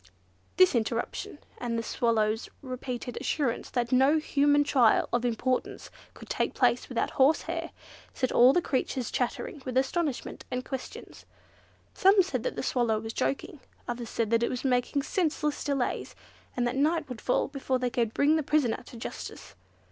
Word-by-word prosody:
This 370 Hz, -1 st, +6 dB
interruption, 235 Hz, -, -2 dB, 0.2 s
and 235 Hz, -1 st, -2 dB
the 230 Hz, -, -2 dB
Swallow's 220 Hz, -1 st, 0 dB
repeated 255 Hz, -1 st, -5 dB
assurance 270 Hz, -6 st, -1 dB
that 240 Hz, -2 st, -1 dB
no 265 Hz, +4 st, +5 dB
human 290 Hz, -1 st, +3 dB
trial 250 Hz, -6 st, +4 dB
of 240 Hz, 0 st, +1 dB
importance 245 Hz, +2 st, -2 dB, 0.2 s
could -, -, -12 dB
take -, -, -1 dB
place -, -, +2 dB
without -, -, -1 dB
horsehair, 325 Hz, +4 st, +1 dB, 0.4 s
set 255 Hz, -, -1 dB
all 250 Hz, +2 st, +7 dB
the 350 Hz, +4 st, +1 dB
creatures 255 Hz, -2 st, -1 dB
chattering 265 Hz, +2 st, -2 dB
with 255 Hz, -1 st, -3 dB
astonishment 275 Hz, +1 st, -1 dB
and 250 Hz, 0 st, -3 dB
questions. 265 Hz, -2 st, -8 dB, 0.7 s
Some 385 Hz, 0 st, +5 dB
said 375 Hz, -, -3 dB
the -, -, -3 dB
Swallow 235 Hz, -4 st, +1 dB
was 225 Hz, +1 st, -6 dB
joking; 305 Hz, +3 st, -2 dB, 0.3 s
others 240 Hz, -1 st, -4 dB
said 230 Hz, -2 st, -1 dB
that 230 Hz, 0 st, +3 dB
it 235 Hz, -, +1 dB
was 250 Hz, -, -4 dB
making 255 Hz, +2 st, +1 dB
senseless 300 Hz, -4 st, -1 dB
delays, 275 Hz, -4 st, -2 dB, 0.4 s
and 245 Hz, -, +1 dB
that 240 Hz, -, -1 dB
night 305 Hz, +3 st, +1 dB
would 250 Hz, -3 st, -7 dB
fall 250 Hz, -, +1 dB
before 270 Hz, -2 st, -2 dB
they 250 Hz, -1 st, -1 dB
could 235 Hz, -4 st, 0 dB
bring 295 Hz, +6 st, +3 dB
the -, -, +1 dB
prisoner 280 Hz, -5 st, +1 dB
to 240 Hz, -, -10 dB
justice. 225 Hz, -, -8 dB
255 Hz, 165 wpm, -28 LUFS, 240-290 Hz, 0.7 s, all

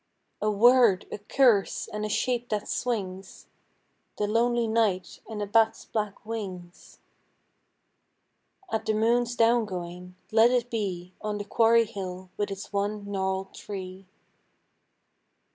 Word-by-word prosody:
A 215 Hz, -, +2 dB
word, 230 Hz, -2 st, +5 dB
a -, -, -5 dB
curse, 215 Hz, -1 st, +2 dB
and 210 Hz, 0 st, -5 dB
a 215 Hz, -, -2 dB
shape 245 Hz, +3 st, -1 dB
that 210 Hz, -1 st, -2 dB
swings; 195 Hz, -6 st, -4 dB, 0.7 s
The 210 Hz, -, 0 dB
lonely 235 Hz, +2 st, +2 dB
night 220 Hz, -5 st, 0 dB
and 210 Hz, -2 st, -3 dB
a -, -, -1 dB
bat's 225 Hz, +2 st, +2 dB
black 210 Hz, -1 st, -4 dB
wings.... 185 Hz, -6 st, -7 dB, 1.7 s
At 220 Hz, 0 st, -2 dB
the 215 Hz, -, +2 dB
moon's 240 Hz, +2 st, +2 dB
down 230 Hz, 0 st, +4 dB
going, 180 Hz, -1 st, -7 dB, 0.2 s
let 225 Hz, +2 st, +6 dB
it 245 Hz, -1 st, 0 dB
be 185 Hz, -5 st, -3 dB
On 210 Hz, -1 st, -2 dB
the 205 Hz, -, -5 dB
quarry 230 Hz, +1 st, +4 dB
hill 185 Hz, -3 st, -7 dB
with 205 Hz, 0 st, -2 dB
its 195 Hz, +1 st, -7 dB
one 200 Hz, 0 st, -2 dB
gnarled 190 Hz, 0 st, -2 dB
tree. 190 Hz, -1 st, -8 dB
210 Hz, 130 wpm, -27 LUFS, 190-230 Hz, 1.7 s, let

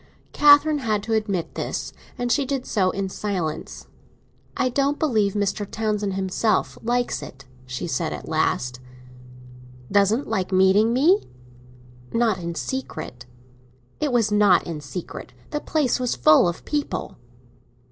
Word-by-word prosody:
Catherine 295 Hz, +1 st, +6 dB
had 215 Hz, -5 st, -1 dB
to 225 Hz, +1 st, -2 dB
admit 205 Hz, -6 st, -1 dB
this, -, -, -4 dB, 0.2 s
and 245 Hz, 0 st, -1 dB
she 285 Hz, -, +3 dB
did 270 Hz, -1 st, -3 dB
so 190 Hz, -3 st, +1 dB
in 195 Hz, +1 st, -2 dB
silence. 180 Hz, -6 st, -4 dB, 0.7 s
"I -, -, +2 dB
don't 280 Hz, +3 st, +1 dB
believe 215 Hz, -10 st, +1 dB
Mr. 205 Hz, 0 st, -1 dB
Townsend 210 Hz, -3 st, -1 dB
himself 195 Hz, +3 st, 0 dB
likes 245 Hz, +1 st, -1 dB
it," 135 Hz, +1 st, -11 dB, 0.2 s
she 130 Hz, 0 st, -4 dB
said 165 Hz, -1 st, -2 dB
at -, -, -7 dB
last. 125 Hz, -5 st, 0 dB, 1.1 s
"Doesn't 205 Hz, +6 st, +3 dB
like 185 Hz, 0 st, -2 dB
meeting 190 Hz, +4 st, +4 dB
me?" 320 Hz, -, +4 dB, 0.9 s
"Not 230 Hz, -5 st, +1 dB
in 170 Hz, -1 st, -5 dB
secret." 125 Hz, -, -5 dB, 0.7 s
"It 300 Hz, -2 st, 0 dB
was 230 Hz, -4 st, +2 dB
not 205 Hz, -3 st, +4 dB
in 160 Hz, -3 st, -5 dB
secret; 150 Hz, +5 st, -7 dB, 0.2 s
the 295 Hz, -, -1 dB
place 295 Hz, -5 st, 0 dB
was 250 Hz, -1 st, -1 dB
full 155 Hz, +7 st, +5 dB
of 175 Hz, -, -4 dB
people." 295 Hz, -1 st, -3 dB
210 Hz, 135 wpm, -23 LUFS, 185-250 Hz, 1.1 s, Catherine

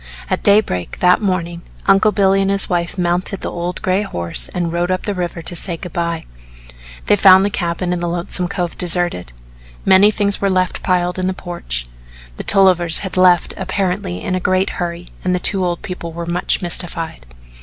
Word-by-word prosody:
At -, -, 0 dB
daybreak, 200 Hz, -, +1 dB
that 180 Hz, +3 st, +3 dB
morning, 175 Hz, -4 st, -2 dB, 0.2 s
Uncle 195 Hz, +2 st, +4 dB
Billy 195 Hz, -1 st, +2 dB
and 195 Hz, -, 0 dB
his 195 Hz, 0 st, +3 dB
wife 175 Hz, 0 st, -2 dB
mounted 180 Hz, +2 st, 0 dB
the -, -, -4 dB
old 175 Hz, +1 st, -5 dB
gray 185 Hz, +1 st, +1 dB
horse 85 Hz, -, -2 dB
and 175 Hz, -2 st, -3 dB
rode 175 Hz, +1 st, -1 dB
up 185 Hz, 0 st, -1 dB
the 205 Hz, -, -1 dB
river 175 Hz, -2 st, -4 dB
to 175 Hz, -, -3 dB
say 170 Hz, 0 st, 0 dB
good 180 Hz, -1 st, -9 dB
by. 170 Hz, -1 st, -3 dB, 0.8 s
They -, -, +4 dB
found 190 Hz, -1 st, +6 dB
the 205 Hz, -, -1 dB
cabin 175 Hz, 0 st, -2 dB
in 175 Hz, -, -2 dB
Lonesome 175 Hz, +1 st, -2 dB
Cove 180 Hz, -2 st, -3 dB
deserted. 175 Hz, -, +1 dB, 0.5 s
Many 195 Hz, +2 st, +6 dB
things 205 Hz, -1 st, +3 dB
were 200 Hz, -, +1 dB
left 185 Hz, -1 st, 0 dB
piled 180 Hz, 0 st, 0 dB
in 185 Hz, -, -1 dB
the 185 Hz, -, -2 dB
porch; 65 Hz, -, -4 dB, 0.5 s
the -, -, -5 dB
Tollivers 180 Hz, -4 st, +4 dB
had 190 Hz, -, -6 dB
left 180 Hz, -2 st, +3 dB
apparently 185 Hz, -, -3 dB
in -, -, -2 dB
a 185 Hz, -, 0 dB
great 185 Hz, +1 st, 0 dB
hurry 175 Hz, 0 st, -5 dB
and 180 Hz, 0 st, 0 dB
the -, -, -1 dB
two 190 Hz, +1 st, +1 dB
old 175 Hz, -1 st, -2 dB
people 180 Hz, -3 st, -6 dB
were 170 Hz, +1 st, -6 dB
much 175 Hz, +2 st, -1 dB
mystified. 165 Hz, -, -4 dB
180 Hz, 190 wpm, -17 LUFS, 170-190 Hz, 0.8 s, found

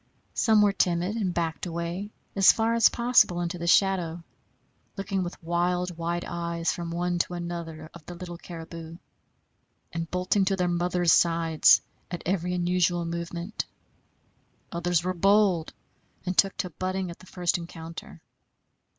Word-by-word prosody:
Some 220 Hz, -2 st, +4 dB
were 205 Hz, -1 st, +3 dB
timid, 180 Hz, +2 st, +1 dB
and 195 Hz, -5 st, 0 dB
backed 170 Hz, 0 st, -2 dB
away 170 Hz, +4 st, -4 dB, 0.3 s
as 195 Hz, -1 st, +8 dB
far 225 Hz, 0 st, +1 dB
as 230 Hz, 0 st, +6 dB
possible 235 Hz, -7 st, +3 dB
into 175 Hz, 0 st, -3 dB
the 170 Hz, -, -3 dB
shadow, 175 Hz, -3 st, +2 dB, 0.7 s
looking 195 Hz, -1 st, -2 dB
with 175 Hz, -1 st, -5 dB
wild, 175 Hz, +1 st, 0 dB
wide 170 Hz, +1 st, -2 dB
eyes 170 Hz, 0 st, -2 dB
from 170 Hz, -1 st, -5 dB
one 175 Hz, +1 st, -1 dB
to 175 Hz, -, -1 dB
another 170 Hz, -2 st, -6 dB
of 170 Hz, -, -12 dB
the 175 Hz, -, -7 dB
little 175 Hz, -1 st, -8 dB
caribou, 165 Hz, -1 st, -9 dB, 1.0 s
and 165 Hz, -1 st, -3 dB
bolting 185 Hz, +2 st, +1 dB
to 195 Hz, 0 st, +1 dB
their 180 Hz, -1 st, 0 dB
mothers' 175 Hz, 0 st, +1 dB
sides 165 Hz, -2 st, +4 dB, 0.3 s
at 175 Hz, -2 st, -5 dB
every 180 Hz, 0 st, 0 dB
unusual 175 Hz, -1 st, +1 dB
movement. 170 Hz, +3 st, -4 dB, 1.0 s
Others 170 Hz, 0 st, 0 dB
were 185 Hz, +1 st, -1 dB
bold, 195 Hz, -2 st, +3 dB, 0.5 s
and 185 Hz, 0 st, -2 dB
took 195 Hz, +1 st, +3 dB
to 180 Hz, -2 st, -3 dB
butting 185 Hz, +2 st, -3 dB
at 170 Hz, -, -11 dB
the 185 Hz, -, -15 dB
first 175 Hz, -1 st, 0 dB
encounter. 165 Hz, -1 st, -9 dB
175 Hz, 150 wpm, -27 LUFS, 170-185 Hz, 1.0 s, as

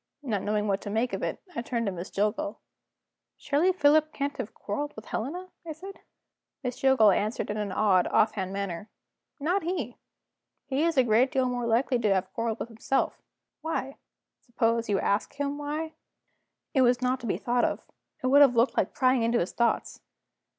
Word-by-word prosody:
Not 215 Hz, -8 st, -1 dB
knowing 210 Hz, +1 st, 0 dB
what 195 Hz, -1 st, 0 dB
to -, -, -6 dB
make 225 Hz, +4 st, 0 dB
of -, -, -2 dB
it, -, -, -3 dB
I -, -, -1 dB
turned 235 Hz, -1 st, -2 dB
to 200 Hz, -, 0 dB
Miss 180 Hz, +1 st, -6 dB
Jillgall. 215 Hz, +10 st, -1 dB, 0.8 s
"Surely 300 Hz, +6 st, +2 dB
Philip 310 Hz, -2 st, +4 dB
can't 285 Hz, 0 st, -3 dB
have 215 Hz, -, -4 dB
quarreled 290 Hz, +8 st, -4 dB
with 220 Hz, -, -10 dB
Helena?" 350 Hz, +11 st, -4 dB
I 325 Hz, -2 st, -6 dB
said. 385 Hz, +5 st, -10 dB, 0.6 s
Miss 250 Hz, 0 st, -3 dB
Jillgall 265 Hz, -6 st, +6 dB
answered 210 Hz, +3 st, -1 dB
in 210 Hz, -, -3 dB
an 210 Hz, -2 st, -2 dB
odd 190 Hz, -2 st, +3 dB
off 215 Hz, -, +3 dB
hand 190 Hz, -3 st, -4 dB
manner: 195 Hz, 0 st, -4 dB, 0.5 s
"Not 350 Hz, +7 st, +1 dB
he! 320 Hz, -, -3 dB, 0.7 s
He 275 Hz, +1 st, -1 dB
is 335 Hz, -3 st, 0 dB
a 260 Hz, -, +6 dB
great 240 Hz, +3 st, +3 dB
deal 260 Hz, -1 st, +1 dB
more 245 Hz, -1 st, -2 dB
likely 240 Hz, +2 st, +2 dB
to 215 Hz, -3 st, +2 dB
have 190 Hz, 0 st, -2 dB
quarreled 230 Hz, -1 st, -2 dB
with -, -, -4 dB
himself." 230 Hz, +4 st, -1 dB, 0.4 s
"Why?" 280 Hz, -4 st, -3 dB, 0.4 s
"Suppose 230 Hz, -2 st, 0 dB
you 200 Hz, -2 st, +2 dB
ask 200 Hz, +6 st, 0 dB
him 285 Hz, 0 st, -2 dB
why?" 305 Hz, +2 st, -3 dB, 0.8 s
It 265 Hz, -, +4 dB
was 245 Hz, 0 st, +3 dB
not 255 Hz, +1 st, +1 dB
to 240 Hz, -, -6 dB
be -, -, 0 dB
thought 245 Hz, 0 st, 0 dB
of; -, -, -1 dB, 0.4 s
it -, -, -1 dB
would 280 Hz, +3 st, +6 dB
have 270 Hz, -4 st, +6 dB
looked 235 Hz, +3 st, +3 dB
like -, -, 0 dB
prying 255 Hz, -1 st, +3 dB
into 230 Hz, +1 st, +2 dB
his 175 Hz, -, -1 dB
thoughts. 235 Hz, -1 st, 0 dB
245 Hz, 190 wpm, -28 LUFS, 215-285 Hz, 0.8 s, Jillgall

